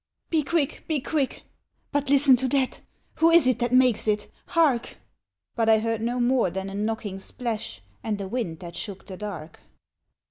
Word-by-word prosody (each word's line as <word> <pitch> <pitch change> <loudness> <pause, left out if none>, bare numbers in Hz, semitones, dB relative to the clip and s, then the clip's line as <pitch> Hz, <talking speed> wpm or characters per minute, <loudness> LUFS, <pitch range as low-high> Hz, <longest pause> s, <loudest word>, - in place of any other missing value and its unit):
^^ - - -51
Be 320 -2 +3
quick! 300 -1 -1
be 310 -3 0
quick! 280 0 -2 0.2
— - - -46
but 285 -1 -1
listen 280 -1 +6
to 260 +1 -1
that 265 -1 0 0.4
Who 325 - +5
is 335 -3 +6
it 255 -2 +2
that 240 -1 0
makes 250 -4 +4
it? 210 -1 0
— - - -37
hark! 280 -8 +2 0.3
'* 95 +1 -59
But 225 -1 +2
I 220 - +7
heard 225 0 -1
no 240 +2 -1
more 245 -4 +2
than 190 +2 -5
a - - -8
knocking 210 -1 -3
splash 215 - -5 0.2
And 215 -2 -2
a 195 - -4
wind 190 -7 -3
that 170 -1 -8
shook 195 -3 -6
the 190 - -8
dark. 175 -7 -7
230 Hz, 205 wpm, -25 LUFS, 200-265 Hz, 0.4 s, I